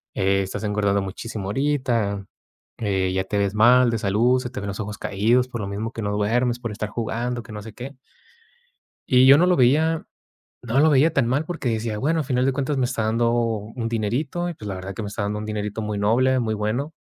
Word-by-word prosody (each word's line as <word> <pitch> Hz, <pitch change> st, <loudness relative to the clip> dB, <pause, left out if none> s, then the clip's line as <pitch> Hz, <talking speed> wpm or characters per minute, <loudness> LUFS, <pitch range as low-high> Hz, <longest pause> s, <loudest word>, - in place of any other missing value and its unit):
Eh, 95 Hz, +1 st, +2 dB
estás 95 Hz, +3 st, -5 dB
engordando 100 Hz, -1 st, +1 dB
muchísimo 100 Hz, +1 st, -6 dB
ahorita, 115 Hz, -6 st, 0 dB, 0.5 s
eh, 95 Hz, -4 st, 0 dB
ya 95 Hz, 0 st, 0 dB
te 105 Hz, -, -2 dB
ves 100 Hz, 0 st, +1 dB
mal 120 Hz, +3 st, +5 dB
de 115 Hz, -, -1 dB
salud. 115 Hz, +6 st, +2 dB
Se 125 Hz, -, -5 dB
te 120 Hz, -, -6 dB
ven 100 Hz, -, -5 dB
los 100 Hz, +2 st, -5 dB
ojos 105 Hz, 0 st, -5 dB
caídos 115 Hz, +6 st, +1 dB
por 120 Hz, -3 st, -5 dB
lo 100 Hz, -, -4 dB
mismo 105 Hz, +3 st, -4 dB
que 115 Hz, -, -5 dB
no 105 Hz, 0 st, -2 dB
duermes 120 Hz, +4 st, +1 dB
por 115 Hz, -3 st, -4 dB
estar 105 Hz, 0 st, -4 dB
jugando, 120 Hz, +2 st, -3 dB
que 110 Hz, -, -13 dB
no 105 Hz, -, -6 dB
sé 110 Hz, 0 st, -10 dB
qué 130 Hz, +3 st, -8 dB, 1.2 s
y 130 Hz, 0 st, +6 dB
yo 140 Hz, +2 st, +8 dB
no 180 Hz, -, +4 dB
lo 180 Hz, -, +3 dB
veía. 155 Hz, +6 st, +3 dB, 0.6 s
No 120 Hz, +3 st, +1 dB
lo 155 Hz, +1 st, +5 dB
veía 150 Hz, +3 st, +4 dB
tan 135 Hz, -6 st, +2 dB
mal 140 Hz, +6 st, 0 dB
porque 160 Hz, -8 st, -2 dB
decía, 110 Hz, -1 st, -2 dB
bueno, 160 Hz, +6 st, +1 dB
al -, -, -2 dB
final 125 Hz, 0 st, 0 dB
de 135 Hz, -, +2 dB
cuentas 140 Hz, +1 st, -1 dB
me 130 Hz, -, +1 dB
está 120 Hz, -3 st, -1 dB
dando 115 Hz, +2 st, +1 dB
un 115 Hz, 0 st, -2 dB
dinerito 130 Hz, +10 st, -2 dB
y -, -, -6 dB
pues 105 Hz, -7 st, -8 dB
la 95 Hz, -, -3 dB
verdad 95 Hz, +1 st, -6 dB
que -, -, -6 dB
me 100 Hz, -, -4 dB
está 100 Hz, +1 st, -4 dB
dando 105 Hz, +1 st, -2 dB
un 105 Hz, -, -5 dB
dinerito 105 Hz, 0 st, -3 dB
muy 105 Hz, -1 st, -3 dB
noble, 130 Hz, +5 st, +3 dB
muy 110 Hz, -3 st, -1 dB
bueno 110 Hz, +9 st, -2 dB
115 Hz, 235 wpm, -23 LUFS, 105-130 Hz, 1.2 s, yo